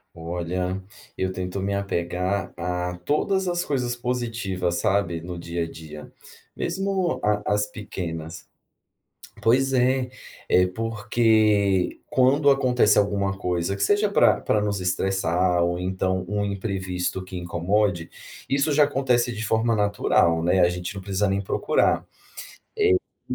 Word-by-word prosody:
Olha, 90 +3 -3 0.3
eu 95 0 -1
tento 90 +1 -4
me 100 +1 -2
apegar 95 0 -2
a 90 0 -3
todas 190 - +1
as 175 0 -1
coisas 125 -4 -1
positivas, 115 -8 -2
sabe, 90 -2 0
no 85 +1 -7
dia 85 0 -3
a 80 - -8
dia, 75 -2 -10 0.5
mesmo 195 -2 -1
a 105 0 +2
a - - +2
as 105 0 +1
pequenas. 85 -7 -6 1.0
Pois 135 +4 +3
é, 130 0 +2 0.4
é 90 - +4
porque, 110 -2 +1
quando 140 +3 +4
acontece 125 -5 +3
alguma 100 -1 +1
coisa 90 0 -1
que 100 - -2
seja 205 - +3
para 200 - +4
para 105 - +1
nos 105 -1 -1
estressar 90 -1 +1
ou 85 0 0
então 95 0 -1
um 105 0 0
imprevisto 95 -2 -3
que 95 - -9
incomode, 90 +1 0 0.4
isso 140 +3 +1
já 150 +1 +5
acontece 125 -4 +1
de 115 +1 -4
forma 110 +2 +1
natural, 100 -5 +2
né, 90 +2 +3
a 85 - +5
gente 90 +2 -5
não 100 - -6
precisa 100 +1 0
nem 95 +1 0
procurar. 100 - +1 1.3
Eh, - - 0
100 Hz, 140 wpm, -24 LUFS, 90-115 Hz, 1.3 s, já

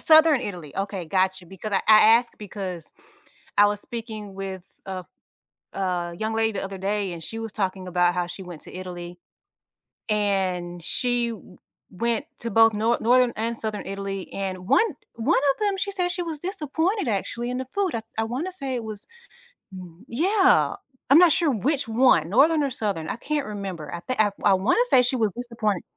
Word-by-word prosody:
Southern 315 -3 +6
Italy. 175 - -7
Okay, 195 -2 -3
gotcha, 185 +1 0
because 195 +4 -7
I 195 - +3
I 215 -1 +9 0.2
asked 240 0 -3
because 190 -5 -6 0.7
I 205 - +8
was 205 0 -1
speaking 220 -4 -7
with 190 -2 -6 0.2
a 185 -1 -5 0.7
a 180 -3 -2
young 220 0 -2
lady 225 0 +1
the 195 - -3
other 195 0 -6
day, 200 0 -1
and 170 -1 -7
she 225 - -6
was 225 -1 -5
talking 190 -2 -2
about 175 0 +2
how 180 -1 0
she 175 +2 -8
went 175 -3 -10
to - - -12
Italy. 175 -1 -7 0.9
And 185 -4 0
she 245 +2 0
w 210 -5 -10 0.3
went 230 +4 -1
to 230 - -4
both 225 +1 +6
Nor 225 +3 +1
Northern 245 +1 +4
and 230 +1 -2
Southern 215 -2 -4
Italy, 195 -1 -5
and 185 -1 -4
one 440 - +3 0.2
one 245 +9 +2 0.2
of - - -26
them, 405 -2 +1
she 400 +1 -1
said 360 -2 0
she 355 -1 -2
was 325 -3 -5
disappointed 360 - -1
actually 235 +3 -2
in 250 - -2
the 260 - -4
food 400 -2 +1
I 225 - -4 0.2
I 225 - +2
wanna 265 +12 -3
say 275 -7 -4
it 235 - -4
was 215 -2 -8 0.7
mm 180 +2 -11
Yeah, 375 - +3 0.3
I'm 280 - +9
not 350 -2 +7
sure 330 -1 +2
which 265 +3 0
one, 220 -9 +4
Northern 300 +8 +4
or 275 - -1
Southern, 200 -10 -3
I - - -2
can't 295 +3 -2
remember, 195 -7 -6
I - - -3
think 255 +7 -3
I 210 -1 +4
I 200 -2 +6
wanna 225 - +3
say 250 - +6
she 250 +1 0
was 220 -4 +1
disappointed 230 -6 -2
215 Hz, 190 wpm, -24 LUFS, 190-250 Hz, 0.9 s, I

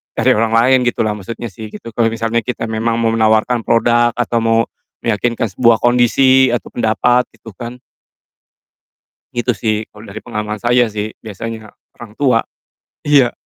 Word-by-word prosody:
cari - - +3
orang 115 0 +1
lain 130 +3 +5
gitulah 115 -3 0
maksudnya 115 +3 -7
sih, 110 +4 -8
gitu, 115 - -9
kalau 115 0 +1
misalnya 115 +1 -1
kita 125 - -4
memang 115 +1 -1
mau 115 -1 +2
menawarkan 110 +2 +2
product 120 0 +2
atau 120 -1 0
mau 115 0 +2 0.4
meyakinkan 115 0 -1
sebuah 115 +3 +3
kondisi 130 +2 +4
atau 120 - -3
pendapat 120 +2 +1
itu 115 0 -12
kan. 120 +1 -6 1.6
Gitu 120 +1 +1
sih, 110 0 -1 0.2
kalau 105 +1 -13
dari 105 +2 -9
pengalaman 105 -3 -4
saya 120 +2 +2
sih, 105 0 -4
biasanya 110 +1 -7 0.3
orang 110 -3 -11
tua. 130 -4 +2 0.7
Iya. 140 -5 +4
115 Hz, 150 wpm, -16 LUFS, 110-120 Hz, 1.6 s, lain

